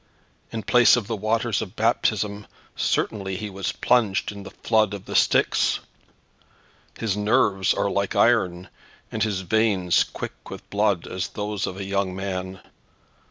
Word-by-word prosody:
In 115 -1 -4
place 120 +4 +6
of 120 -4 -2
the 115 +2 -3
waters 110 +2 0
of 100 -4 -7
baptism, 105 -2 0 0.3
certainly 95 -3 -1
he 105 +1 -5
was 95 -1 -3
plunged 110 -7 +1
in 100 -1 -9
the - - -9
flood 110 -2 +1
of 100 - -10
the - - -6
Styx. - - +3 1.2
His 110 -4 -1
nerves 105 -3 +2
are - - 0
like 100 0 -1
iron, 95 -7 +2 0.4
and - - -4
his 100 -4 0
veins 95 -3 +2
quick - - -8
with - - -9
blood 100 -4 +1
as 90 -1 -3
those 105 -1 -3
of 95 - -6
a 100 - -4
young 100 -1 -1
man. 95 -1 -4
100 Hz, 155 wpm, -24 LUFS, 95-110 Hz, 1.2 s, place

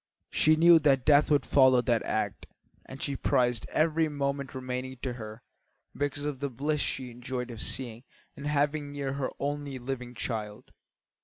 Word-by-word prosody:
She 155 +1 +4
knew 170 +1 +7
that 135 -4 +3
death 145 -1 +5
would 145 -3 +3
follow 130 -2 +5
that 120 -2 +1
act, 105 -3 -2 0.4
and 130 +1 -8
she 140 - -1
prized 120 -3 +1
every 160 +1 +2
moment 140 -2 -3
remaining 130 0 -4
to 130 - -2
her 110 -1 -9 0.5
because 145 0 -2
of 145 -3 -3
the 140 0 -2
bliss 145 +4 -1
she 130 -2 -3
enjoyed 125 +1 -5
of 115 -2 -7
seeing 120 -2 -4 0.3
and 140 - -6
having 145 0 0
near 140 -2 -3
her 140 -1 -2
her - - -1
only 145 -1 -3
living 125 -1 -5
child. 105 -3 -5
135 Hz, 170 wpm, -29 LUFS, 125-145 Hz, 0.5 s, knew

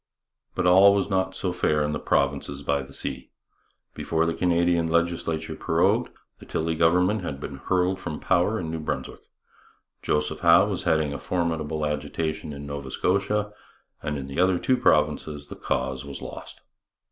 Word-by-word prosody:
But - - 0
all 95 +3 +7
was 100 0 -1
not 95 0 0
so 90 - -2
fair 75 -4 +1
in 75 - -1
the 75 - -2
provinces 70 0 0
by 70 0 0
the 65 +1 -11
sea. - - -6 0.6
Before 80 0 0
the 85 - 0
Canadian 85 -1 +2
legislature 80 -1 -1
prorogued, - - +1 0.3
the - - -13
Tilley 80 +1 -1
government 90 +6 +3
had 70 - -5
been - - -6
hurled 95 +1 0
from 75 - -5
power 95 +4 +1
in 80 -2 -4
New 80 - -3
Brunswick, 75 - -4 0.8
Joseph 75 +1 -1
Howe 85 +1 +6
was 100 -4 -3
heading 80 -3 +2
a - - -5
formidable 80 -3 -1
agitation 75 +1 -3
in 70 0 -7
Nova 70 -1 -6
Scotia, 105 +6 0 0.5
and 75 -1 -3
in 70 - -5
the 70 +4 -5
other 90 0 +4
two 130 - +2
provinces 75 - +1
the - - -7
cause 65 0 -2
was 70 -1 -7
lost. - - -9
80 Hz, 170 wpm, -25 LUFS, 75-90 Hz, 0.8 s, all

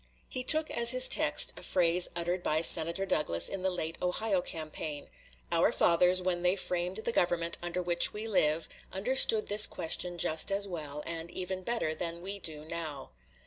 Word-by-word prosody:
He 255 - -4
took 310 +3 +3
as 235 0 +3
his 255 +1 +6
text - - +2
a - - -10
phrase 175 -1 +1
uttered 175 +1 -2
by 155 -2 0
Senator 170 +3 +3
Douglas 85 - 0
in 195 - -4
the 190 - 0
late 165 -3 -5
Ohio 185 +2 -1
campaign 155 -3 -6 0.4
"Our - - +2
fathers, 180 +2 +2
when 180 -1 -1
they 180 +1 +2
framed 180 0 -3
the - - 0
government 170 -4 0
under 175 +1 -4
which 175 0 +2
we 215 +2 -6
live, 160 -6 +1 0.2
understood 220 +1 +3
this 210 +1 +6
question 175 +2 -2
just 160 +2 +1
as 200 +1 0
well, 150 -5 -6
and 165 0 -5
even 185 +1 -5
better 205 -6 -1
than 170 +1 -5
we 200 +2 -5
do 155 -4 -6
now." 155 -4 -6
175 Hz, 180 wpm, -30 LUFS, 165-195 Hz, 0.4 s, his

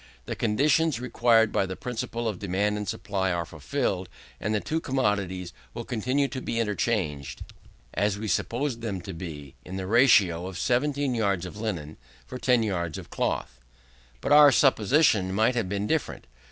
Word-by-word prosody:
The - - -4
conditions 145 +5 +2
required 115 -3 +3
by 95 - +1
the 95 - -5
principle 120 0 -4
of 105 -5 -3
demand 100 +2 0
and 105 -1 -4
supply 95 -2 -1
are 85 -1 -1
fulfilled, 90 - -3 0.3
and 105 - -2
the - - +2
two 160 +9 -2
commodities 100 - -1 0.2
will 120 - -4
continue 130 +4 0
to 130 - -5
be 115 - -2
interchanged, 100 -10 -2 0.5
as 100 -1 0
we 110 +1 -4
supposed 120 +3 -1
them 100 -5 -3
to 95 +2 -7
be, 75 -5 -8
in 95 - -7
the 95 - -4
ratio 100 -6 +4
of 95 -2 -7
17 140 +4 0
yards 100 -6 0
of 90 - -8
linen 90 -9 -4 0.3
for 130 - -7
10 125 -3 +3
yards 85 -6 -2
of - - -10
cloth. - - -2 0.6
But - - -2
our 145 -1 +9
supposition 110 - +3
might 110 +4 +3
have 115 -6 -1
been 100 +1 -2
different. 160 +5 -2
105 Hz, 170 wpm, -26 LUFS, 95-125 Hz, 0.6 s, our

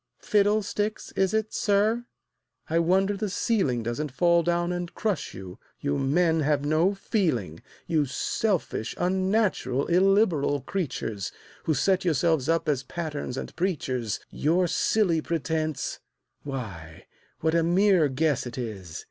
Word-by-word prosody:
"Fiddlesticks, 210 0 0
is 190 -1 +1
it, 220 0 -1
sir? 215 +3 +2 0.6
I 165 +1 +1
wonder 190 +4 +2
the 210 +1 -2
ceiling 185 - 0
Doesn't 125 +6 -3
fall 170 +4 +3
down 175 +1 0
and 175 -1 -3
crush 205 -9 -2
you 95 -1 -9 0.2
you 70 - -1
men 160 +4 +2
have 145 -1 +1
no 160 +6 +2
feeling; 125 - -1 0.2
You 155 -4 +1
selfish, 150 - -1
unnatural, 185 - +1
illiberal 180 -6 +3
creatures, 125 - -3 0.3
Who 155 - +2
set 190 +8 +2
yourselves 160 -3 +1
up 165 0 +1
as 145 -4 +1
patterns 145 -1 -5
and - - -6
preachers, 130 - -1
Your 170 +5 +2
silly 175 0 +2
pretense 155 -2 -2 0.4
why, 100 - -7 0.4
what 160 0 +1
a 170 - +4
mere 180 -1 +4
guess 140 -1 0
it 120 - -8
is! 100 -9 -5
165 Hz, 130 wpm, -26 LUFS, 135-190 Hz, 0.6 s, a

